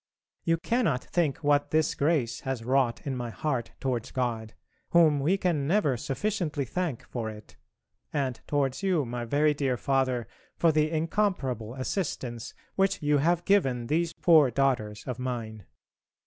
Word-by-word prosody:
You 165 0 +3
cannot 190 - 0
think 160 -5 -1
what 145 0 +3
this 155 -1 +2
grace 140 -6 0
has 130 -4 -4
wrought 130 -2 +1
in 135 -2 -2
my 120 -1 -4
heart 125 -1 -3
towards 125 -4 -2
God, 115 -4 -3 0.3
whom 160 -4 +5
we 165 +8 +2
can 165 -7 0
never 165 -7 +2
sufficiently 145 - -2
thank 165 -1 -3
for 115 -3 -4
it, 105 0 -11 0.6
and 135 -5 -2
towards 140 -1 0
you, 180 -7 +1
my 120 0 -4
very 150 +5 +2
dear 135 -3 0
Father, 130 -3 0 0.3
for 165 - +4
the 155 0 +2
incomparable 155 - -1
assistance 130 - -3 0.2
which 195 -3 +1
you 145 0 +3
have 170 +4 +1
given 135 -12 +2
these 165 +5 0
poor 155 -6 +5
daughters 120 -5 0
of 125 -1 -4
mine. 115 -5 -5
140 Hz, 150 wpm, -28 LUFS, 125-165 Hz, 0.6 s, whom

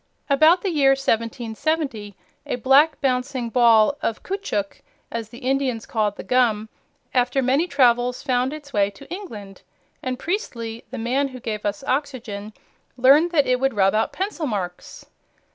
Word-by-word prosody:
About 315 +6 +5
the 390 - 0
year 275 -4 +4
1770, 230 - -2 0.3
a - - -1
black, 270 +6 +4
bouncing 255 -2 -1
ball 235 +1 +5
of 225 - -2
caoutchouc, 370 - -3 0.3
as 230 -2 -4
the 240 - -12
Indians 260 -3 -1
called 210 -3 -1
the - - -8
gum, 225 -4 +1 0.4
after 255 +1 +2
many 275 +7 +2
travels 250 -4 +2
found 255 -1 +1
its 295 -2 -10
way 200 -1 +2
to 205 +8 -15
England, 210 - -9 0.4
and 255 -1 -3
Priestley, 235 - -4
the - - -7
man 255 +5 0
who 255 -1 -9
gave 215 -3 -4
us 205 +4 -4
oxygen, 250 -7 -3 0.5
learned 280 +7 +5
that 305 -5 +2
it 250 0 +1
would 270 -2 0
rub 195 -1 +3
out 220 +1 +1
pencil 375 -5 -3
marks. 185 -6 -5
250 Hz, 155 wpm, -22 LUFS, 225-280 Hz, 0.5 s, About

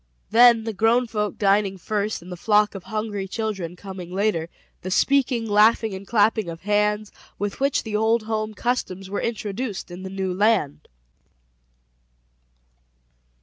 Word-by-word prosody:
Then 235 0 +6
the 225 0 -4
grown 225 +5 +3
folk 210 -3 -3
dining 200 -1 +2
first, 210 +1 -2
and 180 - -11
the - - -4
flock 210 +3 +2
of 195 -3 -9
hungry 215 -3 -3
children 195 -5 -4
coming 185 -2 -9
later; 185 -4 0 0.3
the 185 - -5
speaking, 250 +2 +2
laughing, 215 +1 +4
and 190 +1 -8
clapping 215 -3 +2
of 165 0 -8
hands, 210 +1 0 0.3
with 205 -1 -4
which 275 0 +1
the 220 -2 -4
old 220 +1 +2
home 215 -1 -3
customs 195 -6 -2
were 205 - -2
introduced 210 -3 -4
in 175 +1 -8
the 190 - -6
new 190 -1 -3
land. 200 -7 +1
210 Hz, 145 wpm, -23 LUFS, 190-225 Hz, 0.3 s, Then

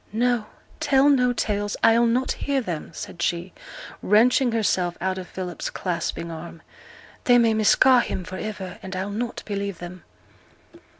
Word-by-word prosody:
'No! 235 0 +1 0.3
tell 285 -2 +4
no 250 -3 +4
tales; 205 -3 -2
I'll 230 +1 +5
not 250 +3 +1
hear 280 -1 -1
them,' 175 -10 -4
said 170 +1 -8
she, 175 +1 -1 0.5
wrenching 240 +5 +4
herself 185 -6 0
out 190 +1 -1
of 180 - -8
Philip's 180 -2 -5
clasping 170 -2 -3
arm. 165 0 -9 0.6
'They 245 -1 +6
may 230 -2 +4
misca' 245 +4 +5
him 185 - -4
for 185 +2 -7
iver, 195 -4 -6
and 190 0 -7
I'll 190 +2 -3
not 235 +3 -4
believe 200 -3 -4
'em.' 175 0 -9
205 Hz, 155 wpm, -24 LUFS, 180-240 Hz, 0.6 s, They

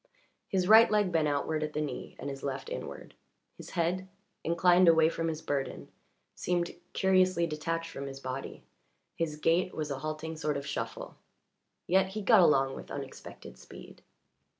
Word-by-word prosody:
His 185 -2 0
right 220 +2 +8
leg 210 -3 +2
bent 160 -3 +2
outward 150 +2 -1
at 155 0 -3
the - - -2
knee, 150 -2 -5
and - - -6
his 140 -1 -6
left 135 -1 -4
inward; - - -7 0.4
his - - -11
head, 180 +3 0 0.3
inclined 175 +2 +4
away 160 -1 +6
from 165 0 -2
his 160 -1 -4
burden, 140 -2 -3 0.4
seemed 175 -1 -1 0.2
curiously 185 -2 +3
detached 165 +1 -3
from 140 0 -6
his 135 0 -8
body; 130 0 -6 0.5
his 160 -2 -2
gait 165 +4 +1
was 150 -2 -3
a 135 - -3
halting 155 +2 -5
sort 150 -2 -1
of 140 - -6
shuffle; - - -5 0.7
yet 190 +1 +3
he 205 +2 -5
got 220 0 +6
along 135 -5 +4
with - - -9
unexpected - - -9
speed. - - -13
165 Hz, 165 wpm, -30 LUFS, 150-180 Hz, 0.7 s, right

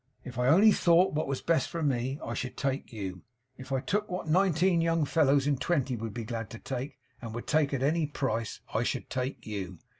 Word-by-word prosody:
If 125 -1 -7
I 125 - +2
only 195 +10 +7
thought 175 -2 +4
what 155 +1 -1
was 135 -1 -3
best 165 -1 +2
for 170 -2 -3
me, 130 -1 0
I - - -3
should 130 - -4
take 135 0 -2
you. 95 -5 -5 0.3
If 130 +1 -11
I 135 -1 +1
took 210 +7 -1
what 180 -2 -4
nineteen 175 0 +3
young 165 -2 +2
fellows 140 -2 +3
in 145 -1 +2
twenty 135 -2 0
would 115 -1 -5
be 115 +2 -5
glad 115 -1 -4
to 115 - -8
take, 130 +3 -5 0.2
and 115 -2 -6
would 120 - -5
take 150 -2 +2
at 135 -2 -1
any 155 +2 +2
price, 115 -6 -2
I - - +1
should - - -2
take 130 -1 -3
you. 95 -4 -5
135 Hz, 220 wpm, -29 LUFS, 120-165 Hz, 0.3 s, only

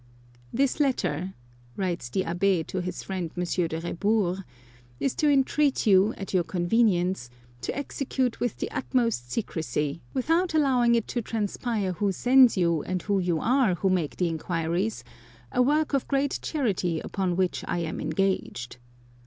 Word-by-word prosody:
" 120 0 -28
This 275 +3 +1
letter," 190 - 0 0.4
writes 175 -9 -2
the 190 +9 0
Abb^ 175 0 +1
to 185 - -3
his 180 0 -5
friend 185 -3 -3
M. 180 - 0
de 170 -2 -1
Rebours, 190 +1 0 0.3
" 120 0 -27
is 275 - 0
to 300 - +2
entreat 280 0 +2
you, 200 +1 +5
at 195 - -6
your 180 -2 +3
convenience, 180 - +1 0.3
to - - -3
execute 265 -3 -2
with 245 -3 -1
the - - -4
utmost 230 - -1
secrecy, 150 - -2
without 330 +6 +1
allowing 250 -5 +4
it 230 - 0
to 240 - -1
transpire 215 -2 -2
who 200 +2 0
sends 250 +4 +5
you 170 -3 +2
and 185 +3 -3
who 200 -2 +1
you 175 -3 0
are 245 - +3
who 190 +2 +1
make 175 -5 0
the 180 - +1
inquiries, 170 +5 -2 0.5
a 250 - +2
work 300 +4 +2
of 275 - +1
great 275 0 0
charity 190 - -1
upon 185 0 -2
which 185 0 0
I - - -1
am 165 -1 -4
engaged. 185 -11 -1
195 Hz, 160 wpm, -26 LUFS, 175-245 Hz, 0.5 s, you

